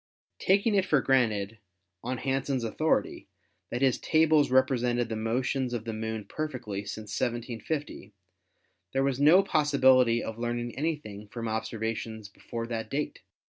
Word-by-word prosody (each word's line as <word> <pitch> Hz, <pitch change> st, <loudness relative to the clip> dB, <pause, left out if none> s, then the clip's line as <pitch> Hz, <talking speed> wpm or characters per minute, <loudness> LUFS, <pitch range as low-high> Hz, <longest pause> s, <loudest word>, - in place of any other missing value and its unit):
"Taking 200 Hz, +3 st, +3 dB
it 195 Hz, -2 st, +2 dB
for 150 Hz, -, +4 dB
granted, 110 Hz, -6 st, +1 dB, 0.4 s
on 125 Hz, +2 st, -2 dB
Hansen's 135 Hz, 0 st, -1 dB
authority, 155 Hz, +8 st, 0 dB, 0.4 s
that 120 Hz, +3 st, -2 dB
his 130 Hz, -2 st, +3 dB
tables 155 Hz, -2 st, +3 dB
represented 125 Hz, -2 st, +2 dB
the 110 Hz, -, -2 dB
motions 125 Hz, +3 st, -1 dB
of 115 Hz, -1 st, -5 dB
the 115 Hz, -, -3 dB
Moon 110 Hz, -1 st, -4 dB
perfectly 120 Hz, -10 st, -4 dB
since 105 Hz, +1 st, -7 dB
1750, 120 Hz, 0 st, -3 dB, 0.8 s
was 135 Hz, -1 st, +1 dB
there -, -, +1 dB
no 175 Hz, +6 st, +7 dB
possibility 130 Hz, -8 st, +4 dB
of 110 Hz, +1 st, -6 dB
learning 120 Hz, 0 st, -3 dB
anything 135 Hz, -9 st, -4 dB
from 115 Hz, +1 st, -5 dB
observations 110 Hz, -1 st, -3 dB
before 115 Hz, +3 st, -6 dB
that 115 Hz, -2 st, -4 dB
date? 150 Hz, +2 st, -3 dB
120 Hz, 135 wpm, -28 LUFS, 110-140 Hz, 0.8 s, no